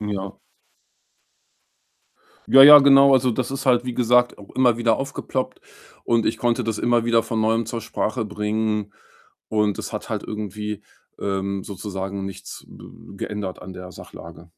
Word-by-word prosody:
Ja. 100 -2 -5 2.1
Ja, 135 - +9
ja, 145 +1 +11
genau. 140 0 +6
Also, 130 -1 +3
das 125 +2 -3
ist 135 0 -5
halt, 125 -1 +3
wie 125 - -4
gesagt, 125 0 +2
auch 100 - -14
immer 125 -3 +2
wieder 115 -2 +2
aufgeploppt 135 -1 -4 0.4
und 115 -1 +1
ich - - -1
konnte 120 0 0
das 110 -1 -3
immer 120 -1 +1
wieder 115 -1 +2
von 110 -1 -2
Neuem 115 +1 0
zur 115 0 -5
Sprache 110 +1 -3
bringen 105 0 -3 0.5
und 105 -2 0
es - - -6
hat - - -6
halt - - -3
irgendwie, 105 0 -6 0.4
ähm, 100 0 -3
sozusagen 95 0 -6
nichts 95 0 -9
b 100 - -14
geändert 105 -3 -5
an 90 +1 -10
der 90 0 -10
Sachlage. 85 0 -12
110 Hz, 155 wpm, -22 LUFS, 100-120 Hz, 2.1 s, ja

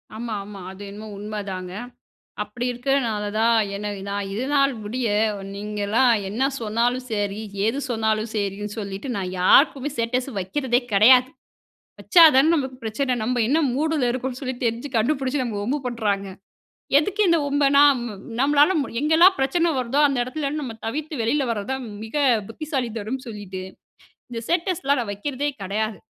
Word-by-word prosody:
ஆமா, 230 0 -4
ஆமா. 200 -1 -10
அது 190 +1 -12
என்னமோ 210 +2 -9
உண்மைதாங்க. 200 -3 -5 0.7
அப்படி 210 +4 -6
இருக்குறதனால 245 -4 0
தான் 230 +1 +4 0.2
என்ன 210 +1 -5 0.2
நான் 200 0 -3
இதுநாள் 275 +4 +2
முடிய, 240 +4 -2 0.5
நீங்கலாம் 210 +4 +1 0.2
என்ன 215 +6 -3 0.2
சொன்னாலும் 235 +3 0
சரி, 205 0 -2 0.2
ஏது 225 +5 +1
சொன்னாலும் 220 -1 0
சரின்னு 205 0 -3
சொல்லிட்டு, 200 +3 -5
நான் 185 -2 -3
யாருக்குமே 275 - +4
ஸ்டேட்டஸ் 245 +2 -1
வைக்கிறதே 240 +6 0
கிடையாது. 250 +5 +6 0.7
வச்சா 345 -3 +6
தானே 270 +3 +6
நமக்கு 265 -4 -2
பிரச்சன, 250 +4 -1
நம்ப 245 +2 -1
என்ன 295 +6 +3
மூடுல 295 -2 +1
இருக்கோம்னு 255 +1 -4
சொல்லி 260 -1 -3
தெரிஞ்சு 235 +5 -2
கண்டுபுடிச்சு 265 +3 0
நம்ம 235 -4 -4
வம்பு 265 +8 -1
பண்றாங்க. 205 -5 -1 0.7
எதுக்கு 405 +7 0
இந்த 335 -1 +4
வம்பு, 285 0 +2
நாம 265 -6 +4 0.3
நம்மளால 290 +5 +4
ம் 280 - -3
எங்கல்லாம் 325 +6 +5
பிரச்சனை 330 +6 +2
வருதோ 255 +3 0
அந்த 275 -3 0
இடத்துலேருந்து 290 +3 -3
நம்ம 235 -4 -5
தவிர்த்து 305 +6 -4
வெளியில 270 +6 +1
வரதுதான் 230 +5 -3 0.2
மிக 225 +6 -7 0.3
புத்திசாலிதனம்ன்னு 250 -2 -4
சொல்லிட்டு, 200 -4 -7 0.7
இந்த 235 - -5
ஸ்டேட்டஸ்லாம் 330 -5 0
நான் 225 -4 -4
வைக்கிறதே 275 +7 -3
கடையாது. 215 +2 -2
245 Hz, 140 wpm, -23 LUFS, 210-275 Hz, 0.7 s, கிடையாது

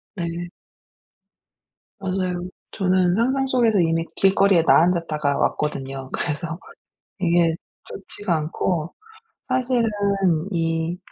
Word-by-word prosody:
네. 170 -1 -4 1.5
맞아요. 185 -2 -2 0.2
저는 185 -2 +2
상상 260 +5 +1
속에서 235 -6 +2
이미 165 -1 +1
길거리에 195 -2 +4
나앉았다가 160 -5 +2
왔거든요. 135 -3 -2
그래서 165 +2 -2 0.6
이게 170 -2 +3 0.3
좋지가 200 -1 -4
않고 155 +1 -2 0.5
사실은 255 -2 +1 0.7
이, 165 0 -1
175 Hz, 215 characters per minute, -22 LUFS, 165-195 Hz, 1.5 s, 길거리에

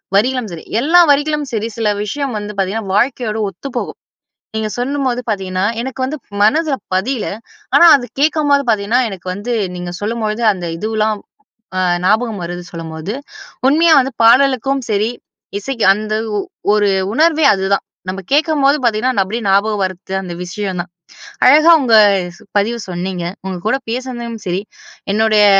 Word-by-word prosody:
வரிகளும் 245 +2 +1
சரி. 165 -2 -8 0.2
எல்லா 320 +8 +5
வரிகளும் 295 +1 +2
சரி, 220 -1 -2
சில 225 -2 +1
விஷயம் 275 +5 -3
வந்து 205 0 -5
பாத்தீங்கனா 195 +2 -2
வாழ்க்கையோட 235 -1 0
ஒத்துப்போகும். 240 +8 -6 0.6
நீங்க 220 0 -1
சொன்னும்போது 255 0 -1
பாத்தீங்கன்னா 190 -2 -1 0.2
எனக்கு 265 +2 -6
வந்து 295 +4 -4 0.2
மனதுல 295 +7 +3 0.2
பதில. 215 +6 -1 0.5
ஆனா 345 - +7
அத 260 -3 -2
கேட்கும்போது 290 -1 +2
பாத்தீங்கன்னா 220 +2 +2
எனக்கு 185 -2 -9
வந்து 205 +6 -5 0.2
நீங்க 175 0 -5
சொல்லும்பொழுது 215 +1 -2
அந்த 180 -3 -5
இதுலாம். 215 +1 -1 0.6
ஆ - - +1 0.2
ஞாபகம் 220 +2 +1
வருது 175 +1 -5
சொல்லும்போது 165 +3 -6 0.6
உண்மையா 325 +3 +5
வந்து 265 0 -1
பாடலுக்கும் 270 +2 +4
சரி, 210 +1 +1 0.5
இசைக்கு 235 +2 -3
அந்த 215 +1 -4 0.2
ஒ - - 0 0.3
ஒரு 210 -1 +3 0.3
உணர்வே 315 +4 +3
அதுதான். 195 0 0 0.3
நம்ம 190 +1 -4
கேட்கும்போது 295 -1 +3
பாத்தீங்கன்னா 225 -1 +1
அப்படியே 225 +4 -4
ஞாபகம் 200 +1 +2
வருது 185 +1 -6
அந்த 180 -2 -6
விஷயம் 185 0 -4
தான். 175 0 -11 0.6
அழகா 305 +6 +7
உங்க 230 -4 +4 0.6
பதிவு 230 +4 0
சொன்னீங்க 180 0 -4 0.2
உங்க 190 -1 -3
கூட 265 - +1
பேசுனதலயும் 240 -3 -5
சரி, 180 +2 -1 0.5
என்னுடைய 215 -1 +4
220 Hz, 140 wpm, -16 LUFS, 195-265 Hz, 0.6 s, ஆனா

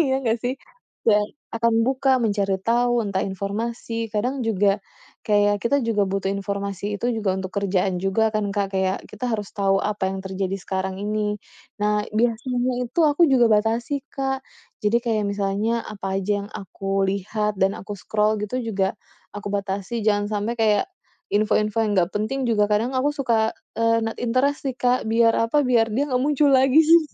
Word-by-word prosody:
iya 265 -4 +2
nggak 225 0 +1
sih? 255 +2 -2 0.5
Dan 210 -2 +3 0.3
akan 230 0 +2
buka 270 +1 +1
mencari 200 -3 +1
tahu 240 +1 +2
entah 195 -1 -1
informasi 225 +4 -3
kadang 250 +6 0
juga, 200 -2 +2 0.5
kayak 205 -1 +3
kita 250 +6 +1
juga 210 -3 +1
butuh 195 0 -1
informasi 200 0 -3
itu 240 +5 -1
juga 215 -5 0
untuk 190 -1 -4
kerjaan 190 -2 0
juga 195 +4 +1
kan 210 -1 0
Kak 200 -1 +1
kayak 190 0 0
kita 250 - -5
harus 210 -4 -3
tahu 195 -1 +1
apa 205 -2 -1
yang 190 0 -4
terjadi 190 0 -3
sekarang 190 0 -3
ini. 210 0 -1 0.5
Nah, 210 0 +1
biasanya 245 +2 0
itu 290 +8 -2
aku 305 +3 +5
juga 245 -5 +4
batasi 225 +6 +1
Kak, 270 -1 -2 0.3
jadi 215 +1 +2
kayak 220 -3 0
misalnya 200 +3 -1
apa 195 -2 -4
aja 200 +1 -1
yang - - -14
aku 195 0 -3
lihat 210 +1 -2
dan 195 0 +2
aku 205 0 -7
scroll 215 +1 +1
gitu 230 +5 -3
juga, 200 -4 -1 0.4
aku 205 0 -5
batasi 200 +2 -3
jangan 205 0 +2
sampai 210 +3 -1
kayak 220 - +2 0.5
info-info 215 +1 +2
yang 205 -3 +1
nggak 175 +1 +1
penting 245 +6 -1
juga 210 -3 +2
kadang 230 +5 +1
aku 260 +3 +2
suka, 235 -6 +1 0.2
eee, 230 0 +2
not 225 - -3
interest 255 +5 +1
nih 255 - -10
Kak 250 0 +3
biar 230 0 +4 0.2
apa 290 -1 +3
biar 230 -3 +3
dia 270 +7 0
nggak 250 - +2
muncul 295 +1 +2
lagi 265 +2 +5
sih, 330 +2 +6
215 Hz, 175 wpm, -23 LUFS, 200-240 Hz, 0.5 s, sih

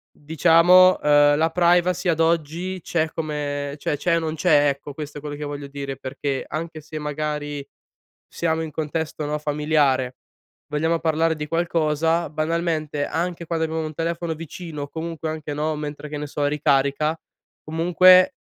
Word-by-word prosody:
diciamo, 170 +4 +5
uhm, 145 0 +5
la 160 +1 +2
privacy 175 +1 +2
ad 165 -2 +1
oggi 165 +3 0
c'è 160 -2 0
come 145 -2 -3
cioè 145 - -1
c'è 170 +3 +1
o - - +1
non 160 -1 -3
c'è, 150 -3 +4
ecco, 140 +1 -5
questo 150 0 -7
è - - -7
quello 145 0 -6
che 150 - -6
voglio 145 -1 -5
dire, 140 -1 -6
perché 135 +1 -4
anche 160 0 -5
se, 155 +1 -7
magari, 150 -1 -4 0.6
siamo 160 -1 -1
in 160 - -6
contesto, 155 0 -3
no, 150 +1 -1
familiare, 145 -4 +1 0.5
vogliamo 160 +3 0
parlare 160 0 +1
di 150 -1 -5
qualcosa, 165 0 +1
banalmente, 155 -2 -1
anche 170 +2 -3
quando 165 -1 -1
abbiamo 160 0 -3
un 155 - -6
telefono 165 +1 -2
vicino 165 -1 -7
o 145 - -8
comunque 165 0 -5
anche, 155 -1 -5
no, 155 +1 -1
mentre 150 0 -6
che 150 - -5
ne 150 - -4
so 145 0 -3
ricarica, 145 +1 +1 0.5
comunque, 180 - +5
155 Hz, 160 wpm, -23 LUFS, 145-165 Hz, 0.6 s, diciamo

